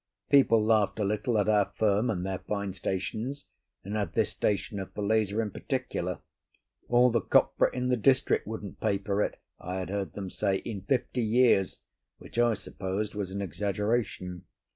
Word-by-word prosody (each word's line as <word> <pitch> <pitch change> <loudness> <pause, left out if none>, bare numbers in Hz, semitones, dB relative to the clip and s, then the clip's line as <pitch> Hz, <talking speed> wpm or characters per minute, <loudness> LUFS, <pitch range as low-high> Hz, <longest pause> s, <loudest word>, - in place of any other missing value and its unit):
People 115 -6 +5
laughed 110 -3 +3
a 105 - 0
little 105 +3 0
at 105 - +2
our 105 -2 +3
firm 105 +2 +2
and 95 -4 -1
their 95 -1 -2
fine 100 -2 -3
stations, 110 +9 -3 0.4
and 100 +2 -5
at 105 -5 -2
this - - +2
station 100 0 -1
of 95 - -6
Falesá 105 0 +1
in 110 -2 -1
particular; - - -3 0.7
all 120 +1 +5
the 115 -1 +2
copra - - +3
in 125 0 -2
the 125 - +2
district 130 +2 +2
wouldn't 105 -3 -6
pay 105 -3 +1
for 100 +1 -1
it - - -2 0.2
(I 90 +1 -5
had 95 0 -4
heard 100 -1 -3
them 95 -3 -6
say) 100 -2 0
in 105 -5 -4
fifty 125 +3 0
years, 115 -4 +3 0.4
which 115 - -6
I 120 -2 +4
supposed 100 +1 -4
was 100 -3 -3
an 100 +1 -3
exaggeration. 100 0 -2
105 Hz, 175 wpm, -29 LUFS, 95-115 Hz, 0.7 s, People